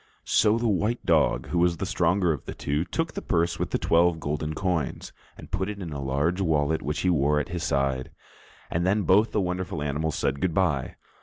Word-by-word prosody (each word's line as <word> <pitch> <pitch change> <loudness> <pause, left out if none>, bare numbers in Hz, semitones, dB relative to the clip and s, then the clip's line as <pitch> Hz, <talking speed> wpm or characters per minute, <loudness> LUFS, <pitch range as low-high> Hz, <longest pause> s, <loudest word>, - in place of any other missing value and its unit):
So 105 +1 +3
the 115 0 0
white 110 +3 0
dog, - - +2
who 85 - 0
was 85 -1 +2
the 95 - -3
stronger 90 -1 +2
of 75 - -8
the - - -6
two, 75 +4 -1
took 165 - -2
the - - -4
purse 85 -1 0
with - - -1
the - - 0
twelve 85 0 +3
golden 75 +1 -3
coins, 90 -5 -2 0.2
and - - -12
put 95 +1 -1
it 105 - -5
in 85 -5 -6
a 70 - -5
large 70 +8 0
wallet 80 -3 +1
which 75 +4 -2
he 90 - +2
wore 75 -2 +2
at 75 - -4
his 85 -1 -4
side, 70 -2 0 0.6
and 85 - 0
then 100 +3 +2
both 105 +5 +4
the - - 0
wonderful 90 -4 -3
animals 75 +1 -1
said 70 0 -1
good 85 -3 0
bye. 80 -9 0
85 Hz, 220 wpm, -26 LUFS, 75-95 Hz, 0.6 s, both